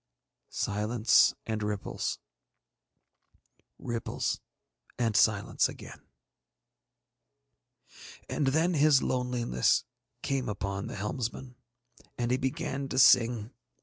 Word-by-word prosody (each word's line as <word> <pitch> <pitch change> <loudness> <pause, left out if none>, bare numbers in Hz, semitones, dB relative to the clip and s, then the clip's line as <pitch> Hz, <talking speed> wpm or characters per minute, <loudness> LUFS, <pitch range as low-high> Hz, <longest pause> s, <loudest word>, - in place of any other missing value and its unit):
Silence 105 +3 +2
and 110 -1 -3
ripples, 105 -1 -3 1.6
ripples 115 -1 -3 0.6
and 115 -3 0
silence 100 0 +3
again. - - -11 2.3
And 145 - -1
then 160 +6 +2
his 150 -3 +4
loneliness 125 - +1 0.4
came 135 -4 -1
upon 100 -1 -4
the - - -7
helmsman, 120 +4 -4 0.6
and 120 0 -1
he 125 - +2
began 135 +1 -3
to - - -4
sing. 120 -3 +5
120 Hz, 85 wpm, -29 LUFS, 105-130 Hz, 2.3 s, sing